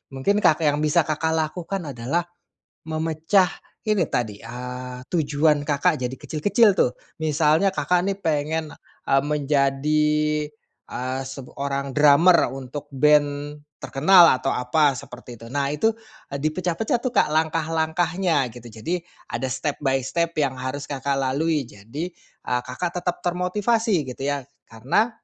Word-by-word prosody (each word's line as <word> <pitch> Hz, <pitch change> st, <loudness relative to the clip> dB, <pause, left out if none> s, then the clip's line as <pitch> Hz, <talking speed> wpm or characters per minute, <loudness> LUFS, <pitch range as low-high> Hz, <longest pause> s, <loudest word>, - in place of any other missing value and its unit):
mungkin 200 Hz, +11 st, +1 dB
Kakak 160 Hz, -5 st, +3 dB
yang 145 Hz, 0 st, +2 dB
bisa 155 Hz, +2 st, +3 dB
Kakak 160 Hz, +1 st, -1 dB
lakukan 165 Hz, +1 st, -3 dB
adalah 130 Hz, +8 st, -1 dB, 0.6 s
memecah 160 Hz, +4 st, +1 dB, 0.3 s
ini 210 Hz, -6 st, +1 dB
tadi, 110 Hz, -6 st, -2 dB
eee, 125 Hz, +2 st, -7 dB
tujuan 150 Hz, -2 st, +2 dB
Kakak 145 Hz, -2 st, +2 dB
jadi 125 Hz, 0 st, -3 dB
kecil-kecil, 200 Hz, -, +2 dB
tuh, 125 Hz, -, +3 dB, 0.2 s
misalnya 160 Hz, +4 st, +2 dB
Kakak, 180 Hz, 0 st, +1 dB
nih, 195 Hz, 0 st, -1 dB
pengen, 155 Hz, 0 st, -1 dB, 0.4 s
eee, 135 Hz, -, +5 dB
menjadi, 150 Hz, +1 st, +1 dB, 0.8 s
eee, 130 Hz, +1 st, -3 dB
sebu 135 Hz, -1 st, -8 dB
orang 140 Hz, 0 st, -2 dB
drummer 150 Hz, +5 st, +5 dB
untuk 135 Hz, +2 st, -7 dB
band 145 Hz, +1 st, +2 dB, 0.2 s
terkenal 170 Hz, +5 st, +6 dB
atau 135 Hz, -, -1 dB
apa 140 Hz, +3 st, +2 dB
seperti 125 Hz, 0 st, -10 dB
itu. 115 Hz, 0 st, -12 dB
Nah 140 Hz, +1 st, 0 dB
itu 220 Hz, +10 st, +2 dB, 0.4 s
dipecah-pecah, 170 Hz, -, -1 dB
tuh, 255 Hz, -, -1 dB
Kak, 235 Hz, -, +3 dB
langkah-langkahnya 160 Hz, +1 st, +1 dB
gitu. 120 Hz, -1 st, -11 dB
Jadi, 165 Hz, +12 st, -3 dB, 0.2 s
ada 130 Hz, +3 st, -3 dB
step-by-step 135 Hz, +3 st, -1 dB
yang 140 Hz, -3 st, +1 dB
harus 130 Hz, +3 st, -5 dB
Kakak, 140 Hz, -1 st, -2 dB
lalui. 140 Hz, +2 st, 0 dB
Jadi, 115 Hz, -, -7 dB, 0.4 s
eee, 125 Hz, 0 st, +1 dB
Kakak 170 Hz, +8 st, -4 dB
tetap 180 Hz, -1 st, -1 dB
termotivasi 185 Hz, -, +1 dB
gitu, 130 Hz, +1 st, -7 dB
ya, 140 Hz, 0 st, -1 dB, 0.3 s
karena 130 Hz, -, +1 dB
150 Hz, 130 wpm, -23 LUFS, 135-165 Hz, 0.8 s, terkenal